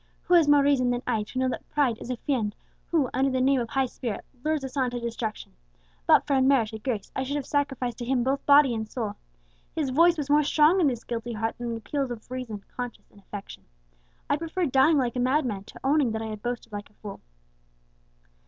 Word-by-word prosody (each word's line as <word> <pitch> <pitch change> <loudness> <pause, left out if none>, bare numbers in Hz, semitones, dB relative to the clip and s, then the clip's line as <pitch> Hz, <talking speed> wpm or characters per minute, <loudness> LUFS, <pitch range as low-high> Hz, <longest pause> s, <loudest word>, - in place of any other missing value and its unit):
Who 360 - 0
has 335 -4 +6
more 290 -1 +6
reason 275 -3 +3
than 245 +1 -1
I 225 -3 0
to 210 +5 -7
know 260 0 +2
that - - -6
pride 265 -7 +1
is - - -7
a 250 - -2
fiend 230 -7 -1 0.3
who, 300 -7 +1
under 270 +1 +2
the 260 -1 0
name 265 0 +3
of 230 - -4
high 270 -1 +1
spirit, 240 -3 -5 0.2
lures 310 -2 0
us 265 0 -6
on 260 -3 +1
to 245 0 -4
destruction? 230 -2 -4 0.5
But - - +6
for 285 - +1
unmerited 255 -5 +2
grace, 225 -7 -3
I - - -1
should 270 +2 -2
have 290 -3 -2
sacrificed 270 -5 -1
to 240 - -4
him 250 -1 +1
both 270 +2 0
body 285 -3 +7
and 220 -1 -4
soul. 220 -4 -3 0.6
His 295 -5 -1
voice 335 +5 +5
was 295 -3 -2
more 295 +1 +5
strong 305 +5 +4
in 315 - +4
this 245 -3 -2
guilty 235 0 -4
heart 225 +1 -2
than 240 -1 -3
the 230 - -2
appeals 270 +4 -2
of 240 0 -8
reason, 235 -6 -5
conscience, 245 -2 -6
and 205 - -18
affection. 200 0 -9 0.6
I - - +2
preferred 330 -1 -2
dying 275 +4 +5
like 250 -3 0
a - - -1
madman, 250 -6 0
to - - -12
owning 275 -4 +2
that 220 - -2
I 220 - -4
had 215 -1 -6
boasted 240 -2 -4
like 205 0 -6
a - - -28
fool!" 205 -1 -9
255 Hz, 230 wpm, -26 LUFS, 230-285 Hz, 0.6 s, body